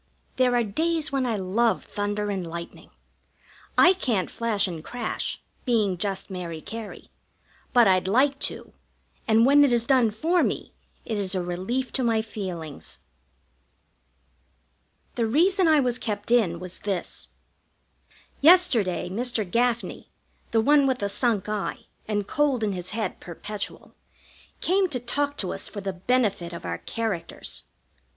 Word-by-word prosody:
There 250 Hz, -1 st, +3 dB
are 240 Hz, -, +3 dB
days 315 Hz, +8 st, 0 dB
when 270 Hz, -2 st, 0 dB
I 230 Hz, -, 0 dB
love 210 Hz, +5 st, +1 dB
thunder 205 Hz, 0 st, -2 dB
and 185 Hz, -3 st, -3 dB
lightning. 170 Hz, +1 st, -8 dB, 0.9 s
I 360 Hz, -, +8 dB
can't 235 Hz, -, -1 dB
flash 215 Hz, -4 st, 0 dB
and 165 Hz, -4 st, -6 dB
crash, 240 Hz, +2 st, -3 dB, 0.2 s
being 215 Hz, -7 st, +2 dB
just 195 Hz, +2 st, -3 dB
Mary 175 Hz, -4 st, -5 dB
Cary; 220 Hz, +4 st, -8 dB, 0.6 s
but 240 Hz, -4 st, +6 dB
I'd 185 Hz, -1 st, +3 dB
like 270 Hz, +7 st, +3 dB
to, -, -, -11 dB, 0.5 s
and 225 Hz, +1 st, +5 dB
when 285 Hz, +2 st, +7 dB
it 280 Hz, -, +4 dB
is 235 Hz, -1 st, +2 dB
done 250 Hz, -3 st, +4 dB
for 325 Hz, +12 st, +1 dB
me -, -, -2 dB, 0.3 s
it 220 Hz, -3 st, -2 dB
is 195 Hz, -1 st, -2 dB
a 185 Hz, -, 0 dB
relief 190 Hz, +9 st, -2 dB
to 260 Hz, -, 0 dB
my 225 Hz, -2 st, +2 dB
feelings. 180 Hz, -9 st, -6 dB, 2.2 s
The 230 Hz, -2 st, 0 dB
reason 355 Hz, -, +3 dB
I 310 Hz, -2 st, +6 dB
was 250 Hz, -2 st, +1 dB
kept 205 Hz, 0 st, -4 dB
in 195 Hz, -9 st, +3 dB
was 180 Hz, 0 st, -8 dB
this. 195 Hz, -4 st, -3 dB, 1.1 s
Yesterday 280 Hz, -, +5 dB
Mr. 225 Hz, +3 st, -1 dB
Gaffney, 235 Hz, +4 st, -1 dB, 0.4 s
the 225 Hz, -, +3 dB
one 285 Hz, +3 st, +5 dB
with 260 Hz, -4 st, 0 dB
a 200 Hz, -, 0 dB
sunk 220 Hz, -2 st, 0 dB
eye 210 Hz, -2 st, -3 dB, 0.2 s
and 205 Hz, -2 st, -1 dB
cold 285 Hz, -6 st, +1 dB
in 210 Hz, -, +1 dB
his 180 Hz, 0 st, -5 dB
head 215 Hz, -3 st, -3 dB
perpetual, 200 Hz, +4 st, -7 dB, 0.7 s
came 375 Hz, +1 st, +2 dB
to 260 Hz, -5 st, -2 dB
talk 285 Hz, +4 st, -1 dB
to 185 Hz, -, -1 dB
us 195 Hz, -, -3 dB
for 205 Hz, -, -7 dB
the 195 Hz, -1 st, -3 dB
benefit 200 Hz, -3 st, 0 dB
of 170 Hz, -, -7 dB
our -, -, -3 dB
characters. 220 Hz, -7 st, -4 dB
220 Hz, 150 wpm, -25 LUFS, 195-255 Hz, 2.2 s, I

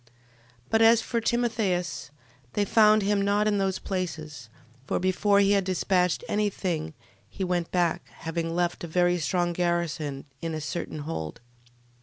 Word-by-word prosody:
12:18. 120 Hz, -, -34 dB, 0.6 s
But 225 Hz, -, +3 dB
as 225 Hz, 0 st, +6 dB
for 235 Hz, -2 st, -1 dB
Timotheus, 220 Hz, -, -1 dB, 0.4 s
they 205 Hz, -, +1 dB
found 215 Hz, 0 st, +5 dB
him 200 Hz, 0 st, +2 dB
not 205 Hz, +1 st, +2 dB
in 205 Hz, -1 st, +2 dB
those 190 Hz, -1 st, 0 dB
places, 155 Hz, -, -5 dB, 0.4 s
for -, -, 0 dB
before 200 Hz, +2 st, +2 dB
he 200 Hz, 0 st, +3 dB
had 200 Hz, -1 st, +3 dB
dispatched 185 Hz, -1 st, +1 dB
any 210 Hz, 0 st, +1 dB
thing 160 Hz, -5 st, -3 dB, 0.3 s
he 195 Hz, -, -5 dB
went 175 Hz, -2 st, -1 dB
back, 175 Hz, -1 st, 0 dB
having 165 Hz, 0 st, -4 dB
left 175 Hz, 0 st, -1 dB
a -, -, -4 dB
very 175 Hz, +1 st, +2 dB
strong 175 Hz, +3 st, 0 dB
garrison 170 Hz, -5 st, -1 dB, 0.2 s
in 165 Hz, -1 st, -3 dB
a -, -, -3 dB
certain 155 Hz, 0 st, -4 dB
hold: 80 Hz, -, -4 dB
12:19. -, -, -18 dB
180 Hz, 165 wpm, -27 LUFS, 165-205 Hz, 0.6 s, as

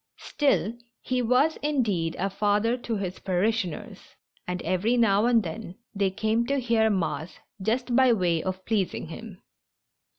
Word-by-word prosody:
Still, 275 Hz, -6 st, 0 dB, 0.3 s
he 255 Hz, -1 st, -1 dB
was, 255 Hz, +7 st, +3 dB
indeed, 220 Hz, -, 0 dB
a 195 Hz, +1 st, -1 dB
father 210 Hz, +4 st, +1 dB
to 240 Hz, -2 st, -4 dB
his 185 Hz, -2 st, -4 dB
parishioners, 190 Hz, -1 st, -1 dB, 0.5 s
and 180 Hz, 0 st, -2 dB
every 185 Hz, +8 st, +1 dB
now 220 Hz, -1 st, +4 dB
and 235 Hz, -3 st, +4 dB
then 180 Hz, +2 st, -6 dB, 0.2 s
they 200 Hz, -2 st, +1 dB
came 220 Hz, +4 st, 0 dB
to 280 Hz, +1 st, +1 dB
hear 230 Hz, -3 st, +2 dB
mass 180 Hz, -4 st, -2 dB, 0.2 s
just 240 Hz, +4 st, 0 dB
by 260 Hz, -1 st, +6 dB
way 175 Hz, -7 st, +1 dB
of 185 Hz, +1 st, -4 dB
pleasing 200 Hz, -7 st, -1 dB
him. 200 Hz, +2 st, -10 dB
215 Hz, 145 wpm, -26 LUFS, 185-235 Hz, 0.5 s, by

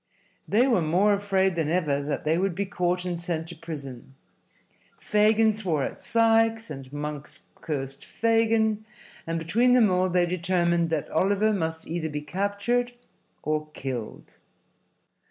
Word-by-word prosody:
They 230 Hz, +5 st, +4 dB
were 235 Hz, -9 st, +3 dB
more 180 Hz, +7 st, +3 dB
afraid 195 Hz, -2 st, +1 dB
than 160 Hz, -3 st, 0 dB
ever 155 Hz, -5 st, +1 dB
that 145 Hz, 0 st, -3 dB
they 155 Hz, +1 st, +2 dB
would 190 Hz, -2 st, 0 dB
be 200 Hz, +2 st, -1 dB
caught 180 Hz, -1 st, -1 dB
and 175 Hz, -2 st, -3 dB
sent 170 Hz, -2 st, -2 dB
to 170 Hz, -, -7 dB
prison. 140 Hz, -5 st, -8 dB, 0.8 s
Fagin 215 Hz, +1 st, +3 dB
swore 180 Hz, -9 st, -1 dB
at -, -, -5 dB
Sikes, 225 Hz, -1 st, +2 dB
and 135 Hz, -1 st, -8 dB
Monks 145 Hz, 0 st, -6 dB
cursed 135 Hz, -3 st, -5 dB
Fagin, 225 Hz, -1 st, +1 dB, 0.4 s
and 165 Hz, 0 st, -1 dB
between 225 Hz, +10 st, +2 dB
them 230 Hz, -6 st, +5 dB
all 185 Hz, 0 st, +2 dB
they 175 Hz, 0 st, +3 dB
determined 170 Hz, -1 st, +1 dB
that 160 Hz, -3 st, -1 dB
Oliver 200 Hz, +5 st, +2 dB
must 160 Hz, -4 st, -2 dB
either 165 Hz, -1 st, -3 dB
be 150 Hz, 0 st, -4 dB
captured 200 Hz, +9 st, -1 dB, 0.5 s
or 155 Hz, 0 st, -1 dB
killed. 125 Hz, -5 st, -6 dB
180 Hz, 145 wpm, -26 LUFS, 155-210 Hz, 0.8 s, them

